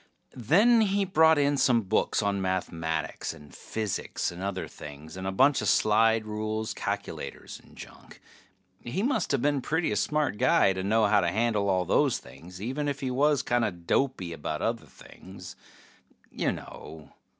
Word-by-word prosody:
Then 205 - +4
he 200 -1 +1
brought 160 -4 +4
in 145 0 +2
some 120 -4 +3
books 105 +2 0
on 100 -1 0
mathematics 85 -4 -3
and 75 -2 -15
physics 110 -5 -3
and 85 +1 -9
other 95 -1 -3
things, 75 +2 -11
and 95 0 -5
a - - -1
bunch 135 +8 +3
of - - -2
slide 110 +1 +3
rules, 110 0 -3
calculators, - - -5
and - - -20
junk. - - -13 0.6
He 130 - -3
musta 255 - +1
been 145 +3 +1
a - - -2
pretty 160 -2 -1
smart 145 +2 0
guy 95 - +4
to 95 - -4
know 110 +3 +2
how 105 0 +4
to 85 - 0
handle 105 0 0
all 90 -1 +1
those - - +2
things, 90 +2 -13
even 135 +8 -3
if 140 -1 -3
he 130 -2 -2
was 145 +2 +2
kinda 120 -2 +1
dopey 90 +1 -1
about 75 -3 -4
other - - -2
things. 95 -1 -13 0.8
You - - -1
know 80 -2 -10
110 Hz, 165 wpm, -27 LUFS, 95-140 Hz, 0.8 s, Then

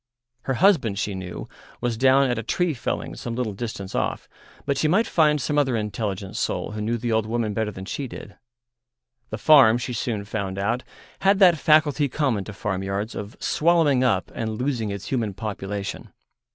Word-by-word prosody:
Her 135 - 0
husband, 145 - +3
she 105 0 -2
knew, 95 -2 -6 0.3
was 120 -1 -1
down 135 +3 +4
at 120 -2 -1
a - - -2
tree 175 +8 0
felling 120 - -4
some 115 - -5
little 120 -4 -2
distance 100 -3 -6
off, - - -2 0.4
but 140 - 0
she 155 - +1
might 195 +9 +3
find 150 -2 +3
some 145 +2 0
other 135 -4 +1
intelligent 105 -3 -3
soul - - -2
who 105 0 -5
knew 115 +3 -1
the 120 +1 -3
old 110 -1 +1
woman 115 -2 -1
better 110 0 -1
than 95 -2 -8
she 135 +6 -4
did. 105 -3 -10 0.9
The 110 - -4
farm, 130 -3 +6
she 125 +1 -4
soon 110 -3 -2
found 100 -3 -4
out, 115 +6 0 0.4
had 195 +1 +4
that 180 -5 +6
faculty 150 -2 +3
common 125 -9 0
to 105 - -8
farmyards 95 +2 -3
of 105 +2 -7
swallowing 155 -5 +3
up 125 - +1
and 110 -1 -3
losing 125 -5 -1
its 100 0 -6
human 115 -7 -1
population. 100 -2 -5
115 Hz, 185 wpm, -24 LUFS, 105-140 Hz, 0.9 s, farm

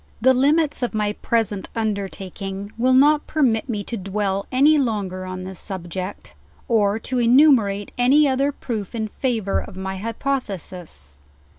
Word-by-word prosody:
The 260 +3 +5
limits 290 +3 +2
of 245 -2 -2
my 210 -1 0
present 215 -3 -1
undertaking 195 -2 -4
will 255 +2 +3
not 295 +3 +4
permit 255 -6 +1
me 210 -3 -2
to 235 - -5
dwell 195 0 -2
any 290 +4 +5
longer 200 -7 -2
on 185 0 -6
this 185 -1 -7
subject, 185 0 -6 0.3
or 215 -4 +2
to 250 +3 -3
enumerate 235 -5 +4
any 280 +5 +5
oth 265 0 +1
er 280 +1 +2
proof 225 -7 -5
in 220 -2 -2
favor 225 -5 -1
of 185 - -9
my 190 0 -4
hypothesis. 190 - -4
220 Hz, 150 wpm, -22 LUFS, 195-255 Hz, 0.3 s, The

